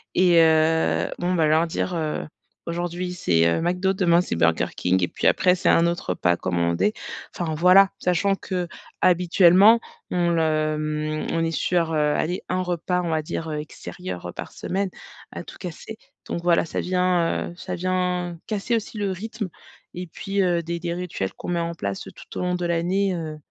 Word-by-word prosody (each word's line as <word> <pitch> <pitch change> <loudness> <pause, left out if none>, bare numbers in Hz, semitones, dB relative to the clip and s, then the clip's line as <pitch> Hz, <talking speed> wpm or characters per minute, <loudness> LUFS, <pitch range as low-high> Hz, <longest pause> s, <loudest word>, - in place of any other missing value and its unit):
et 175 -2 +5
heu, 160 0 +3
bon 180 +1 0
bah 160 -3 +3
leur 160 +2 +3
dire, 175 +2 -2
heu, 155 -2 -2 0.4
aujourd'hui, 175 +1 -3
c'est, 85 - +2
heu, 85 - +1
McDo, 180 +3 +1
demain 175 -3 +3
c'est 180 - -3
Burger 85 0 +2
King 95 +1 +1
et - - +2
puis - - -6
après 180 0 +4
c'est 180 - +1
un 170 +1 +5
autre 170 0 -3
repas 85 0 +2
commandé. 85 - 0 0.4
Enfin 165 -3 -2
voilà, 185 +4 +6
sachant 180 +2 +1
que 180 -2 -3 0.3
habituellement, 180 +5 +6 0.3
on 175 -1 +1
le 155 -2 +1
mmh, 155 0 -2
on 165 - +1
est 165 - -1
sur, 165 -1 0
heu, - - +1 0.2
aller 175 +3 -1
un 185 - 0
repas, 180 0 -1
on 170 - -2
va 160 -1 +1
dire, 160 +1 -5
heu, 150 - -3
extérieur, 150 - -7
heu, - - -7
par - - -7
semaine, 195 +1 -2 0.4
à - - -7
tout - - -12
casser, 185 +5 -8 0.3
donc 170 - -4
voilà, 170 -1 +3
ça - - -3
vient, 180 -2 +1
heu, - - -11
ça - - -5
vient 180 -1 -1
casser 215 +2 -1
aussi 220 0 -4
le 200 -2 -1
rythme 215 +1 -5 0.4
et 180 0 -6
puis, 195 +4 -2
heu, 175 -2 +2
des 170 +1 -4
des 170 0 -3
rituels 175 - -4
qu'on - - -8
met 175 -1 0
en 170 0 -2
place 100 -10 -4
tout - - -11
au - - -2
long 180 0 0
de 175 -1 -2
l'année, 180 +3 +1
heu, 155 -2 -5
175 Hz, 195 wpm, -24 LUFS, 160-180 Hz, 0.4 s, voilà